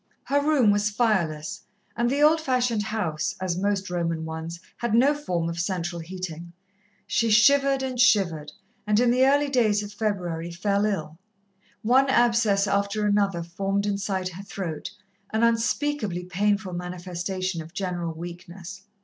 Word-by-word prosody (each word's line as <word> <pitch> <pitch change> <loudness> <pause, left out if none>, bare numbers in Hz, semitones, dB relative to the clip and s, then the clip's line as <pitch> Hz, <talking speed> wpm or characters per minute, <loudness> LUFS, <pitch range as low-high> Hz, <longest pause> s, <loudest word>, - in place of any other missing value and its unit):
Her 285 +1 +1
room 285 -8 +4
was 205 +1 +1
fireless, 190 -9 0 0.3
and 235 +1 +1
the 285 +3 +1
old 315 +1 +5
fashioned 250 -6 +1
house, 205 -8 -2
as 185 -2 -1
most 195 +1 -1
Roman 165 -2 -1
ones, 160 +1 -6 0.2
had 235 -2 0
no 265 +5 +5
form 180 - -2
of 170 0 -4
central 175 -1 -2
heating. 170 -1 -7 0.5
She 230 - +1
shivered 275 +5 +4
and 255 -2 -3
shivered, 170 -11 +3 0.4
and 210 0 +3
in 245 0 +4
the 255 +2 +4
early 285 +1 +3
days 220 -6 +2
of 205 0 -8
February 180 -6 -2
fell 200 +4 0
ill. 165 -6 -3 0.6
One 260 +4 +4
abscess 230 -5 +3
after 200 +1 0
another 200 -4 +1
formed 195 +4 -2
inside 195 -2 -1
her 185 +2 -9
throat, 185 -5 -5 0.4
an 220 +1 0
unspeakably 230 -4 0
painful 200 +1 0
manifestation 180 0 -4
of 160 +3 -12
general 175 -3 -2
weakness. 175 +2 -9
200 Hz, 150 wpm, -25 LUFS, 175-230 Hz, 0.6 s, old